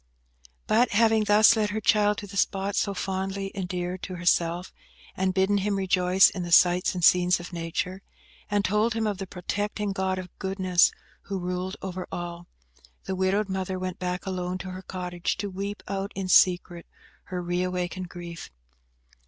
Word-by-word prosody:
But 235 +2 +3
having 220 0 +4
thus 210 +2 +6
led 215 -1 +1
her 210 +2 -2
child 210 -1 +3
to - - -6
the 200 0 -11
spot 195 0 0
so 200 -1 0
fondly 195 +1 -3
endeared 180 -1 -4
to 185 - -6
herself, 175 0 0 0.4
and 190 0 +1
bidden 190 +2 +2
him 200 +1 0
rejoice 185 -1 +4
in 185 - -5
the 175 -1 -5
sights 180 +2 +5
and 180 - -3
scenes 180 0 +5
of 175 +1 -9
Nature, 175 +3 -3 0.5
and 205 -1 +1
told 215 +3 +1
him 225 -1 0
of 205 -3 -2
the 195 - -5
protecting 205 +3 -3
God 190 -1 -1
of 185 -1 -8
goodness 190 -2 +3 0.3
who 195 - -3
ruled 180 +1 -3
over 185 -1 -5
all, 175 0 -6 0.6
the 190 - -3
widowed 190 +3 +1
mother 190 -1 -3
went 185 -1 -4
back 180 0 -3
alone 185 -1 -3
to 185 0 -7
her 185 0 -7
cottage, 180 -1 -3
to 200 0 -4
weep 200 +2 -5
out 195 +1 -3
in 195 -1 -3
secret 175 -1 +3 0.4
her 180 - -4
re 175 0 -1
awakened 180 0 -3
grief. 170 -2 -8
185 Hz, 175 wpm, -26 LUFS, 180-200 Hz, 0.6 s, thus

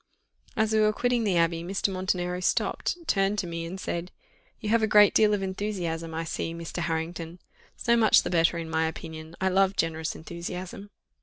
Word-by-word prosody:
As 220 0 +2
we 220 - +4
were 215 0 +4
quitting 245 +1 0
the 190 -4 +2
Abbey, 165 0 +2
Mr. 195 +2 -1
Montenero 180 -1 -1
stopped, 185 - 0
turned 195 -6 +2
to 195 - -1
me, 165 -1 -4
and 185 +3 -6
said, 175 0 -4 0.5
"You 210 - -4
have 230 +1 +3
a 220 - +2
great 210 -1 +6
deal 215 -1 +5
of 205 -2 0
enthusiasm, 185 -4 -3
I 165 - -2
see, 165 0 -3
Mr. 170 +1 -6
Harrington: 165 +1 -3 0.4
so 235 -1 +2
much 225 -2 +5
the - - -3
better, 170 0 +3
in 165 -1 -4
my 160 0 +1
opinion 160 0 -8
I 190 - +2
love 195 +1 +3
generous 160 -1 -1
enthusiasm." 180 +4 -7
180 Hz, 190 wpm, -27 LUFS, 165-205 Hz, 0.5 s, great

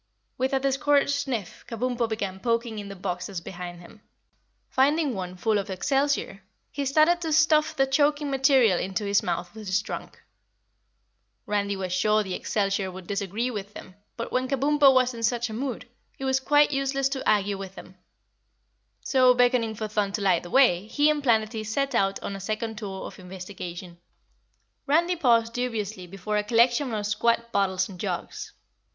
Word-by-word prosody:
With 260 +1 -1
a 270 - +3
discouraged 275 +1 +2
sniff 270 -9 -3
Kabumpo 240 0 -2
began 200 -4 -3
poking 230 -1 -1
in 200 -1 -7
the 195 - -7
boxes 180 0 -4
behind 175 0 -8
him. 190 +5 -15 0.7
Finding 290 +1 +2
one 185 -3 -5
full 210 +3 +1
of 200 - -5
excelsior, 270 0 0 0.3
he 280 -1 -3
started 310 +5 +4
to 325 -2 -2
stuff 310 0 +3
the 270 -2 +3
choking 290 +1 +1
material 265 -8 +4
into 195 +3 -3
his 200 0 +2
mouth 175 - -3
with 215 -1 -9
his 190 +2 +2
trunk. - - -7 1.3
Randy 200 -1 -1
was 185 -2 -4
sure 210 +3 +2
the 190 -2 -5
excelsior 195 -1 -1
would 185 0 -10
disagree 200 +5 -2
with 205 -2 -6
him, 185 - -11 0.2
but 230 - -5
when 255 +1 0
Kabumpo 280 +1 +4
was 255 -1 +3
in 230 - -8
such 235 0 0
a - - -6
mood, 250 +1 -4 0.3
it 270 - -5
was 265 0 +2
quite 295 +2 +4
useless 275 -1 0
to 270 -4 -2
argue 205 -2 +1
with 195 -1 -8
him; 185 - -12 1.1
so, 255 -2 +4
beckoning 245 -3 +2
for 215 0 -4
Thun 210 -2 -1
to 210 - -2
light 185 -3 +3
the 175 - -10
way, 210 -7 +4
he 295 +6 +3
and 300 -1 -1
Planetty 220 -3 +1
set 275 +6 -1
out 195 0 +1
on 200 - -4
a - - -6
second 215 +2 -4
tour 195 -3 -6
of - - -10
investigation. 180 -1 -8 0.9
Randy 340 +5 +3
paused 230 -7 +2
dubiously 215 -6 -3
before 195 +3 -3
a 210 - +1
collection 240 +4 +3
of 210 -2 -2
squat 235 +3 0
bottles 190 -2 +1
and 185 -3 -11
jugs. - - -4
225 Hz, 175 wpm, -26 LUFS, 195-270 Hz, 1.3 s, started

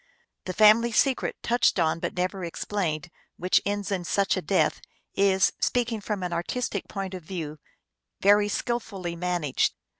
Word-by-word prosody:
The 185 - -3
family 215 +4 +6
secret, 260 +4 +1
touched 240 -2 +2
on 165 -1 +1
but - - -4
never 185 +1 -2
explained, 170 -2 -3 0.3
which 180 +1 +2
ends 205 0 -2
in 185 -3 -1
such 195 +3 +1
a - - -2
death, - - +1 0.3
is, 195 -1 +3
speaking 235 -3 0
from 205 -2 -3
an 175 -1 -3
artistic 200 +4 -2
point 195 -1 -5
of 185 - -6
view, 155 -3 -6 0.6
very 205 +1 +4
skillfully 205 -7 -3
man 175 -1 -2
aged. 140 -3 +1
190 Hz, 155 wpm, -26 LUFS, 175-210 Hz, 0.6 s, family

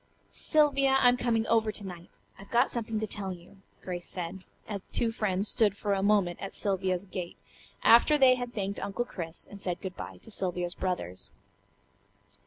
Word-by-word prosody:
"Sylvia, 275 -3 +3
I'm 245 -1 +6
coming 235 -2 +1
over 220 -2 +2
to 205 -1 -4
night. 175 -2 -10 0.2
I've 195 - -12
got 235 - +3
something 225 -2 -2
to - - 0
tell 200 -2 -3
you," 180 +2 -11 0.3
Grace 175 -1 -4
said, 180 +1 -5 0.2
as 200 -2 -4
the - - -33
two 230 - 0
friends 205 -3 0
stood 205 -4 +3
for 205 -1 0
a 195 - 0
moment 200 -3 +2
at 195 - -6
Sylvia's 190 -2 0
gate, 185 -3 -6 0.5
after 240 +6 +7
they 265 -2 +7
had 245 -1 -3
thanked 200 -3 -3
Uncle 200 +5 -2
Chris, 165 -7 -7
and 200 -1 -12
said 180 -3 -2
good 190 -1 -6
bye - - -7
to 225 - -9
Sylvia's 180 -3 -1
brothers. 175 - -3
200 Hz, 185 wpm, -29 LUFS, 185-230 Hz, 0.5 s, after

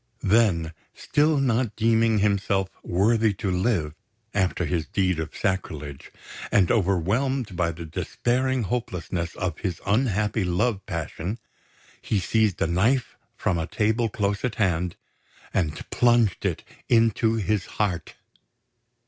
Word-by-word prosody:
Then, 95 -7 +3 0.2
still 150 +1 +2
not 125 -4 +1
deeming 115 0 +3
himself 100 -2 +1
worthy 110 +3 +2
to 95 0 -2
live 90 -5 0 0.4
after 95 -3 +1
his 80 0 -1
deed 90 -4 0
of 80 0 -5
sacrilege, 75 -8 -3 0.4
and 95 -4 +4
overwhelmed 105 +4 +1
by 85 -1 +1
the 85 +1 -8
despairing 125 +9 -1
hopelessness 90 -6 -3
of 90 -1 -3
his 95 -5 -3
unhappy 105 -1 +1
love 95 +4 0
passion, 85 +5 -4 0.6
he 105 - 0
seized 105 +1 +1
a - - +1
knife 110 +9 +1 0.2
from 85 - 0
a 80 - -2
table 110 +2 +1
close 100 -1 -1
at 125 -3 -1
hand 90 -4 0 0.6
and 80 -5 -1
plunged 120 -5 +3
it - - -3 0.3
into 115 -1 +3
his 105 -2 0
heart. 90 -7 -1
100 Hz, 125 wpm, -25 LUFS, 90-115 Hz, 0.6 s, and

